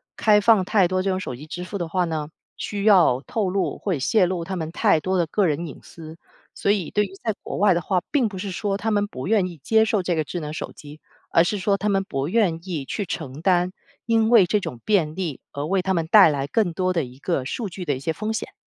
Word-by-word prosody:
开 210 -1 +4
放 215 -2 +5
太 195 -3 +3
多 185 +1 0
这 195 - -1
种 185 0 0
手 125 - -5
机 150 +5 -11
支 175 +3 -6
付 190 +3 -5
的 170 - -2
话 180 +1 0
呢， 155 -2 -3 0.3
需 200 -1 -4
要 175 -11 +5
透 210 -5 -1
露 195 +1 -1
或 185 -7 -1
泄 185 - +3
露 175 -2 -2
他 190 +2 -5
们 160 -2 -4
太 160 - +3
多 185 +3 -1
的 170 - +2
个 185 +3 +1
人 155 +3 -1
隐 150 - -9
私。 160 0 -12 0.4
所 200 - +1
以 195 -6 -1
对 210 - +2
于 195 - -6
在 220 -2 0
国 - - -6
外 200 -2 +4
的 170 - 0
话， 180 +2 0
并 270 -6 +2
不 190 - -8
是 195 +1 -4
说 195 +2 -2
他 220 +2 -2
们 205 0 +1
不 130 -9 -7
愿 200 -3 +2
意 170 -3 -9
接 220 +10 +3
受 210 -3 0
这 175 - 0
个 155 -2 0
智 175 - -5
能 150 -1 -6
手 - - -5
机， 150 +1 -13 0.3
而 165 - +5
是 205 +4 -1
说 200 +1 +1
他 205 +2 -1
们 195 -1 +1
不 135 -6 -3
愿 180 -4 +1
意 150 -6 -3
去 205 +6 -3
承 150 -4 -6
担 180 0 +2 0.3
因 225 -1 +2
为 225 -6 +7
这 210 +4 +1
种 125 -10 -6
便 170 -8 +1
利 175 -7 -4
而 140 +1 -4
为 190 +3 +1
他 190 0 0
们 165 -1 0
带 195 -1 +7
来 140 -2 -1
更 185 +3 0
多 185 +1 0
的 165 - 0
一 125 +1 -13
个 145 -2 -1
数 205 - -4
据 180 +1 -7
的 145 -3 0
一 - - -6
些 160 +4 -2
风 215 +5 -3
险。 220 - -4
185 Hz, 290 characters per minute, -23 LUFS, 160-205 Hz, 0.4 s, 为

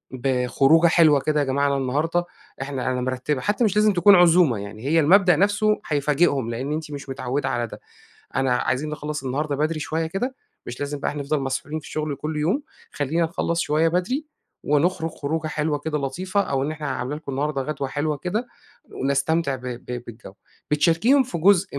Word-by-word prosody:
بخروجة 135 +5 +3
حلوة 155 -4 +5
كده، 150 +2 0
يا 145 - +1
جماعة 140 +2 +1
أنا 140 0 +1
النهارده 155 +7 0 0.4
إحنا 135 -2 -2
أنا 125 0 -2
مِرَتِّبة، 130 +2 -2
حتّى 205 +4 0
مش 210 -3 +2
لازم 210 0 +4
تكون 195 +2 +6
عزومة 175 - +5
يعني، 100 +3 -8
هي 165 +2 +3
المبدأ 180 +2 +5
نفْسه 205 +3 +2
هيفاجئهم 145 -3 +1
لإن 130 +6 -3
أنتِ 155 -1 -5
مش 140 -1 -7
متعوّده 135 +1 -2
على 120 -2 -1
ده، - - -11 0.6
أنا 130 -2 +2
عايزين 140 +5 -1
نخلّص 150 -1 -5
النهارده 140 +3 -2
بدري 155 +2 -1
شوية 160 +1 -2
كده، 220 +11 -3 0.3
مش 120 +3 -7
لازم 145 0 -3
بقى - - -1
إحنا 145 -1 -4
نفضل 145 +1 -1
مسحولين 135 +3 -3
في - - -14
الشغل 150 -2 -3
كلّ 155 +2 -4
يوم، 185 - 0 0.3
خلّينا 150 +4 -1
نخلّص 170 0 -1
شوية 155 +2 +2
بدري 185 - -1 0.4
ونُخرُج 160 +3 +1
خروجه 155 +2 -3
حلوة 150 -1 -1
كده 150 +1 -2
لطيفة، 180 +9 -1
أو 135 -8 -1
إن 145 - -1
إحنا 150 -1 -6
عاملة 130 +2 -3
لكم 150 -3 -7
النهارده 140 0 -1
غدوة 140 -1 -3
حلوة 150 +1 -1
كده، 210 - -2 0.4
ونستمتع 140 +2 0
ب 125 - -15
ب 125 0 -6
بالجو، 115 -4 -11 0.4
بتشاركيهم 170 - +4
في 245 -9 -5
جزء 185 -3 +3
150 Hz, 185 wpm, -23 LUFS, 135-170 Hz, 0.6 s, تكون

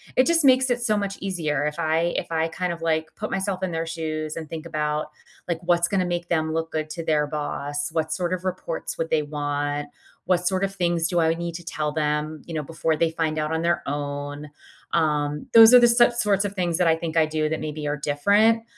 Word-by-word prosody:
it 255 - +5
just 335 +1 +3
makes 260 -1 +5
it 245 0 0
so 215 -3 +1
much 200 -1 -2
easier 155 -7 -1
if 150 +1 -4
I 165 +1 +1
if - - -1
I 160 0 +1
kind 175 +1 -3
of, 165 - -10
like, 160 -1 -1
put 215 - -5
myself 190 -1 -2
in 190 -1 -2
their 165 0 -2
shoes 155 -2 -4
and 160 -2 -7
think 165 0 -6
about, 150 -1 -2 0.4
like, 170 -2 -2
what's 175 -1 +2
gonna 185 -1 0
make 175 -1 -3
them 160 -2 0
look 165 0 -2
good 155 -1 -3
to 165 0 -5
their 150 -1 +2
boss? 145 0 -3
What 160 -1 -1
sort 180 -1 -1
of 185 0 -4
reports 180 -3 -4
would 165 - -3
they 155 - +3
want? 145 0 -3 0.4
What 180 0 +1
sort 190 0 0
of 195 0 -1
things 170 -3 +1
do 175 0 0
I 160 0 +3
need 170 0 -4
to 175 - -7
tell 155 -2 -3
them, 150 0 -1
you 170 - -7
know, 155 - -2
before 160 +1 -1
they 165 +1 +1
find 160 -1 -1
out 155 0 -1
on 160 - 0
their 170 +1 +1
own? 145 +1 -4 0.4
Um, 150 -2 0
those 225 0 +10
are 250 - +11
the 240 - +6
so 240 +1 +5
sorts 210 -4 +1
of 200 - -3
things 175 -3 0
that 180 - +3
I 160 - +4
think 165 -1 -5
I 160 -1 +5
do 155 0 -1
that 160 - -2
maybe 150 -1 -4
are 145 - 0
different. 200 +11 +3
165 Hz, 240 wpm, -24 LUFS, 155-180 Hz, 0.4 s, are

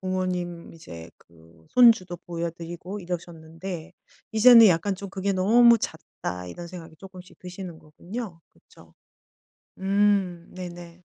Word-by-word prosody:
부모님 180 -2 -3
이제 85 - -11
그 80 -1 -22
손주도 225 -8 +5
보여드리고 170 +3 -6
이러셨는데 175 0 -7 0.4
이제는 230 +1 +8
약간 185 +2 +2
좀 200 +1 -8
'그게 195 +1 -2
너무 230 +5 +5
잦다.' 90 - -6
이런 170 - -8
생각이 170 -2 -11
쪼끔씩 185 -1 -13
드시는 180 -2 -9
거군요. 175 +4 -8
그쵸. 80 -1 -21 0.9
음 195 -3 +1
네네. 175 -1 -9
180 Hz, 270 characters per minute, -25 LUFS, 165-195 Hz, 0.9 s, 이제는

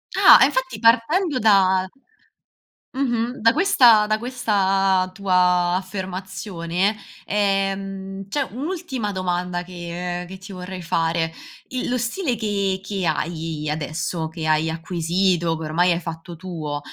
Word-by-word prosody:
Ah, - - +8
e - - +9
infatti 260 -5 -2
partendo 255 - +3
da 190 -4 +4 1.1
Mh-mh, 245 -2 -1
da 230 +1 +6
questa 245 - +5
da 215 0 +1
questa 195 -6 +1
tua 180 -2 +2
affermazione, 185 0 -3 0.3
ehm, 195 -1 -2
c'è 280 +5 -1
un'ultima 270 - -4
domanda 180 -1 -2
che 175 0 -5
che 190 +1 -9
ti 195 +1 -11
vorrei 185 0 -7
fare: 165 -1 0 0.4
il 255 -1 -3
lo 250 - +1
stile 245 +3 -1
che 200 -3 -1
che 195 -1 -3
hai 160 -1 -2
adesso, 160 +2 -3
che 160 -1 -5
hai 155 +1 +2
acquisito, 170 +1 0
che 160 - -6
ormai 175 +4 +2
hai 170 - +1
fatto 165 0 -8
tuo, 160 -5 -5
190 Hz, 130 wpm, -22 LUFS, 175-215 Hz, 1.1 s, e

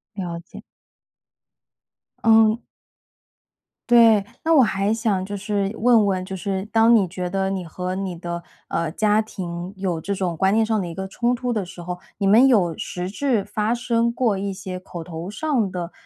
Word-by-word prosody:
了 175 -4 -4
解。 170 - -13 1.6
嗯。 220 0 +5 1.3
对， 225 -4 +6 0.2
那 325 - +1
我 280 -5 +7
还 200 -1 0
想 215 -4 0
就 205 0 -5
是 200 0 -1
问 225 -3 +4
问， 185 -1 -1
就 190 - -6
是 190 +1 -3
当 230 +1 +5
你 195 -4 +3
觉 180 0 -4
得 195 0 -1
你 190 -2 -3
和 180 +2 -5
你 190 -2 -3
的， 170 0 -5 0.3
呃， 165 -1 -1
家 215 +3 +2
庭 180 -4 -6
有 180 -4 -2
这 200 +3 -2
种 180 -3 -2
观 190 +3 +2
念 225 0 +3
上 220 -2 0
的 175 - -4
一 165 - -7
个 190 0 -4
冲 240 +5 0
突 245 -1 -2
的 210 -3 -1
时 175 -1 -10
候， 180 0 -5 0.2
你 200 - -1
们 225 +7 +6
有 185 -10 +3
实 180 0 -5
质 240 -4 0
发 210 +3 -1
生 235 -1 +1
过 230 -5 0
一 200 0 -2
些 185 -1 -6
口 175 -2 -8
头 170 +1 -7
上 245 -4 0
的 175 -1 -5
195 Hz, 200 characters per minute, -22 LUFS, 180-220 Hz, 1.6 s, 我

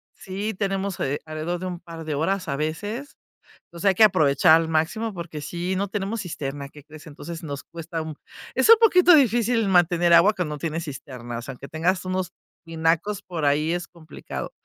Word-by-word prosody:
sí, 200 +3 -4
tenemos, 195 -1 -2
eh, 140 +2 -1
alrededor 155 +3 -4
de 185 - -5
un 180 -2 -5
par 165 -2 -9
de 155 -2 -2
horas, 185 +6 -1
a 140 - -1
veces. 205 - -4 0.5
Entonces, 170 +4 -4
hay 190 - +4
que 220 - +6
aprovechar 160 -4 +5
al 165 - -3
máximo, 170 +8 -1
porque 170 -4 -7
sí, 175 +5 -3
no 200 +2 -1
tenemos 205 +2 -3
cisterna, 140 -5 -5
¿qué 150 0 -15
crees? 155 +2 -13
Entonces 160 +2 -8
nos 145 -3 -6
cuesta 165 0 -6
un 160 -1 -6 0.4
es - - +2
un 460 - +11
poquito 360 -5 +7
difícil 235 -5 +3
mantener 175 -1 +4
agua 170 +6 +7
cuando 165 -6 -3
no 145 - -10
tienes 165 0 -3
cisternas, 125 -4 -7
aunque 135 +1 -8
tengas 180 +4 0
unos 185 0 -2 0.3
tinacos 165 +5 0
por 165 -5 -4
ahí 150 +3 +2
es 175 0 -3
complicado. 165 -3 -8
170 Hz, 190 wpm, -24 LUFS, 155-195 Hz, 0.5 s, un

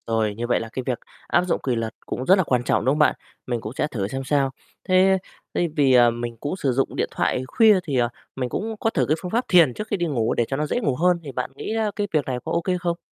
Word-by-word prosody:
Rồi, 110 -2 0
như 120 +2 -3
vậy 120 - +2
là 115 - -6
cái 130 - -3
việc 125 -3 -1 0.3
áp 175 - +3
dụng - - +1
quỳ 125 -3 0
luật 115 -1 -3
cũng 130 - -4
rất 190 - +6
là 190 - +3
quan 125 -5 +1
trọng, - - +1
đúng 130 - +4
không 150 - -2
bạn? 150 - +4 0.3
Mình 120 -2 -2
cũng 110 - -6
sẽ 150 - -1
thử 105 -9 -3
xem 135 +5 -4
sao. 140 -1 +2 0.4
Thế 190 +1 +5 0.4
thế 175 - +2
vì, 140 -3 +4
à, 120 -1 +7
mình 120 0 -5
cũng 145 +8 -3
sử 140 -8 0
dụng 135 +2 0
điện - - 0
thoại 130 - 0
khuya 215 - +5
thì, 145 -6 -2
ờ, 120 -1 +2 0.3
mình 125 -2 -2
cũng 220 - -3
có 225 - +1
thử - - +1
cái 155 - +2
phương 180 - -5
pháp 240 +3 +1
thiền 165 -8 +5
trước 215 - -6
khi 205 - -1
đi 175 - 0
ngủ 120 -8 0
để 120 - +1
cho 135 - -2
nó 150 - 0
dễ 195 - -1
ngủ 140 - 0
hơn, 180 +4 +3
thì 140 - -7
bạn 125 0 -4
nghĩ, 220 - -4
a, 220 -2 0
cái 205 -1 -1
việc 150 -3 +2
này 130 -2 -2
có - - -3
ô 170 - +1
kê 180 +1 0
không? 175 -1 -2
140 Hz, 300 wpm, -23 LUFS, 120-180 Hz, 0.4 s, à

